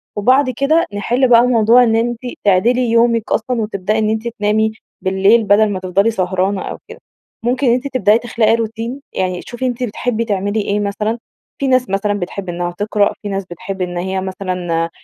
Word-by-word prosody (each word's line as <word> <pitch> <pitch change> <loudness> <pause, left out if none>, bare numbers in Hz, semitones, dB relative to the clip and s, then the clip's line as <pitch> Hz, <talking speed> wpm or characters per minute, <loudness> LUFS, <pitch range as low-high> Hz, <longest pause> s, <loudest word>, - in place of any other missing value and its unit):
وبعد 255 +6 +3
كده 280 +7 +2
نحل 245 +6 +1
بقى 235 -1 +6
موضوع 235 +1 +5
إن 225 -2 +2
أنتِ 235 +1 0 0.3
تعدلي 230 +6 +3
يومك 230 -1 +2
أصلًا 230 +1 0
وتبدئي 210 0 -2
إن 215 0 +1
أنتِ 220 +1 -2
تنامي 220 -1 0 0.3
بالليل 195 +4 +3
بدل 210 +1 +4
ما 190 -2 -3
تفضلي 195 +4 +1
سهرانة 185 0 -1
أو - - -5
كده. - - -11 0.4
ممكن 250 +2 0
إن 235 - +5
أنتِ 255 +3 -1
تبدئي 225 -5 +3
تخلقي 230 -2 +1
روتين، 230 +4 -4
يعني 185 -1 -2
شوفي 240 +2 -4
أنتِ 250 0 -2
بتحبي 230 0 -2
تعملي 205 0 -1
إيه 205 +1 -1
مثلًا، 210 +3 -2 0.4
في 275 - 0
ناس 255 -3 +2
مثلًا 195 +2 0
بتحب 180 +1 -5
إنها 175 0 -3
تقرأ، 205 0 +1
في 205 - -5
ناس 195 -1 -3
بتحب 185 +2 -7
إن 175 -1 -3
هي 190 +1 -2
مثلًا 180 -3 -2
215 Hz, 185 wpm, -17 LUFS, 195-235 Hz, 0.4 s, بقى